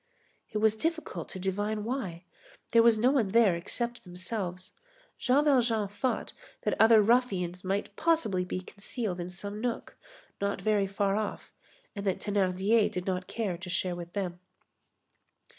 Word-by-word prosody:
It - - -3
was 220 0 +3
difficult 320 - -3
to - - -6
divine 205 +3 -1
why. 210 -8 -3 0.5
There 230 - +7
was 230 -1 +5
no 245 +4 +4
one 260 -7 +2
there 205 -3 +4
except 235 +8 -4
themselves. 185 0 -5 0.5
Jean 275 +4 +3
Valjean 240 -7 +3
thought 245 +6 -2 0.3
that - - +1
other 220 -1 +7
ruffians 195 -7 +1
might 200 +2 -2
possibly 310 - +2
be 180 0 -4
concealed 200 0 -4
in 175 +1 -4
some 205 +4 -6
nook, 240 -1 -3 0.5
not 200 0 0
very 210 -2 +2
far 195 0 0
off, 215 -1 -4 0.4
and 200 - -4
that 190 - +1
Thénardier 205 +2 +2
did 180 0 -4
not 185 -1 -2
care 200 -7 -2
to 185 0 -7
share 180 0 0
with 175 0 -8
them. 180 -3 -3
205 Hz, 155 wpm, -29 LUFS, 185-230 Hz, 0.5 s, There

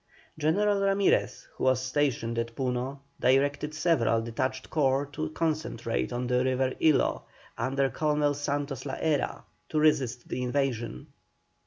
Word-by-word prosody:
General 200 +7 +2
Ramirez, 195 0 +1
who - - -3
was 130 -1 +4
stationed 130 -3 0
at 115 0 -3
Puno, 130 +1 -2 0.2
directed 145 +4 +2
several 135 -9 +2
detached 130 +3 -3
corps 140 -2 +2
to 155 +2 -3
concentrate 155 -9 -2
on 120 +1 -2
the 125 0 +2
river 130 0 +1
Ilo, 155 -3 +3 0.3
under 135 +3 0
Colonel 150 0 +1
Santos 145 -2 -3
la 135 - -3
Hera, 155 -3 -1 0.3
to 155 - 0
resist 130 -6 +2
the 125 - -3
invasion. 125 -2 -1
135 Hz, 135 wpm, -28 LUFS, 125-150 Hz, 0.3 s, was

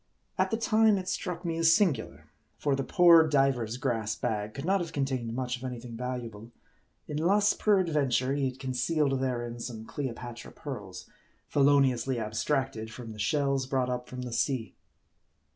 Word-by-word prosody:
At - - +1
the 225 - 0
time 220 -2 +4
it 185 -1 -5
struck 180 -1 -3
me 165 -1 -1
as 165 0 +5
singular; 180 -9 -1 0.3
for 145 -2 +1
the 135 - -2
poor 170 -1 +6
diver's 135 -6 +1
grass 115 -5 -1
bag 105 -1 -3
could 140 - -5
not 195 +1 +2
have 165 -2 -5
contained 130 -5 -2
much 125 -1 -2
of 125 - -13
any 125 -2 -4
thing 120 -1 -9
val 125 +1 -3
uable; 115 -1 -9 0.6
unless, 190 +8 +2
peradventure, 150 - +2
he 140 -2 0
had 130 - -10
concealed 135 +2 0
therein 120 -2 -2
some 115 -2 -6
Cleopatra 120 -3 -6
pearls, 105 - -8 0.4
feloniously 135 -3 +3
abstracted 110 +1 -2
from 115 0 -8
the 105 - -12
shells 140 +1 +1
brought 130 -2 0
up 125 0 -4
from 125 0 -6
the 125 -2 -5
sea. 120 -1 -1
130 Hz, 165 wpm, -29 LUFS, 120-150 Hz, 0.6 s, poor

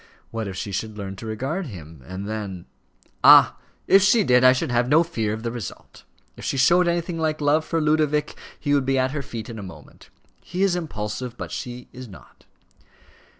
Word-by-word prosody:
What, 115 -2 -4
if 95 - -6
she 100 - -5
should 105 +3 -4
learn 100 -1 -6
to 110 - -8
regard 135 - -3
him, 80 - -11
and 95 +2 -6
then 100 -5 -5 0.3
" - - -44 0.3
"Ah! - - +8 0.3
if 195 - +6
she 205 +3 +4
did, 125 -5 +4
I 130 - +8
should 130 -1 -1
have 120 +1 +1
no 160 +4 +5
fear 115 -11 -2
of 110 +1 -5
the 115 - -2
result. 115 -8 -9 0.3
If - - -12
she - - -2
showed 175 +7 +4
anything 170 0 -1
like 155 -1 -1
love 150 +2 +2
for 165 +1 -1
Ludovic, 150 -1 +1 0.2
he 145 -1 0
would 140 -2 +3
be 135 0 +2
at 130 0 +1
her 150 0 -3
feet 115 -6 -7
in 115 -2 -8
a - - -6
moment. 80 -7 -13 0.3
He 180 +2 -2
is 195 -3 +2
impulsive, 125 -6 -5
but - - -7
she 125 0 -6
is 130 0 -9
not." 95 - -16
125 Hz, 210 wpm, -23 LUFS, 110-155 Hz, 0.3 s, Ah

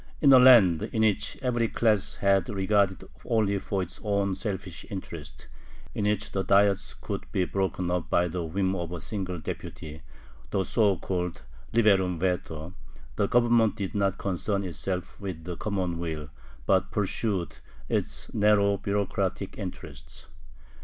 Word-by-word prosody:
In 140 -2 +6
a 130 - +9
land 115 -11 +7
in 110 - +1
which 105 -3 +1
every 120 -2 +1
class 110 -3 +1
had 100 -3 +2
regard 100 -1 +1 0.2
only 105 -3 +1
for 95 0 -2
its 90 - -10
own 100 -2 +1
selfish 95 -3 -5
interests, 80 -7 -8 0.5
in 105 - -2
which 105 0 0
the 95 - -1
Diets 100 0 +2
could 100 -2 -6
be 95 -3 +1
broken 95 -2 -1
up 90 -2 -2
by 90 0 +3
the 90 +1 -3
whim 95 +3 -1
of 85 -2 -4
a 90 - -4
single 95 -1 -3
deputy 80 -1 -7 0.5
(the 95 - 0
so 100 0 +2
called 90 -1 -3 0.3
liberum 95 -6 +3
veto), 85 -2 -2 0.4
the 100 - +1
Government 120 -2 +3
did 100 -2 -4
not 100 -1 +1
concern 100 +1 -1
itself 90 +2 -4
with 90 -5 -5
the 90 +1 -5
common 90 -4 -2
weal, 80 -4 -4 0.3
but 95 0 +2
pursued 100 -3 -2 0.3
its - - -2
narrow 100 -1 +3
bureaucratic 100 0 -2
interests. - - -8
95 Hz, 145 wpm, -27 LUFS, 90-105 Hz, 0.5 s, a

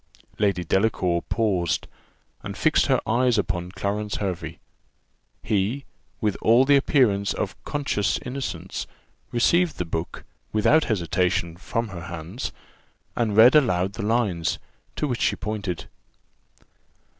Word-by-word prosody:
Lady 100 -4 +1
Delacour 90 -2 +1
paused, 95 -7 0 0.6
and - - -7
fixed - - +3
her - - +3
eyes 120 +2 +2
upon 90 -3 -2
Clarence 105 +2 -2
Hervey. 95 -4 -4 0.9
He, 110 +5 0 0.3
with 105 -3 0
all 120 +4 +5
the 145 +1 +5
appearance 120 -8 +2
of - - -3
conscious 140 -8 0
innocence, 125 -10 -4 0.4
received 170 +8 +2
the 90 - -2
book, 80 0 -4 0.3
without 115 +9 +4
hesitation, 90 - 0
from 115 +5 -3
her 85 -4 -7
hands, 85 +7 -5 0.6
and 110 -3 0
read 120 +3 +9
aloud 95 -10 +3
the - - -5
lines, 105 -6 0 0.4
to 150 - -1
which 125 -3 -2
she - - +2
pointed. 100 -5 -4
105 Hz, 120 wpm, -24 LUFS, 90-120 Hz, 0.9 s, read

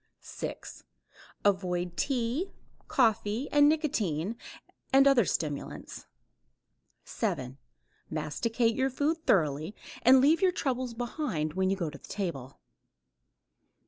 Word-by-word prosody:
6. - - -7 0.6
Avoid 180 -3 0
tea, 265 - -1 0.4
coffee 225 +1 +1
and 290 0 +6
nicotine 220 - 0 0.6
and 270 +1 +6
other 260 -6 +5
stimulants. 150 -5 -4 1.0
7. 130 +1 -3 0.5
Masticate 225 +10 0
your 265 +3 +1
food 295 +5 0
thoroughly 155 +2 +2 0.3
and 260 +2 +7
leave 300 +7 +4
your 375 -1 +4
troubles 255 -5 -2
behind 235 - -2
when 190 +1 +1
you 195 - +2
go 170 -5 -2
to 140 - -11
the - - -15
table. 140 -10 -4
225 Hz, 110 wpm, -29 LUFS, 165-265 Hz, 1.0 s, and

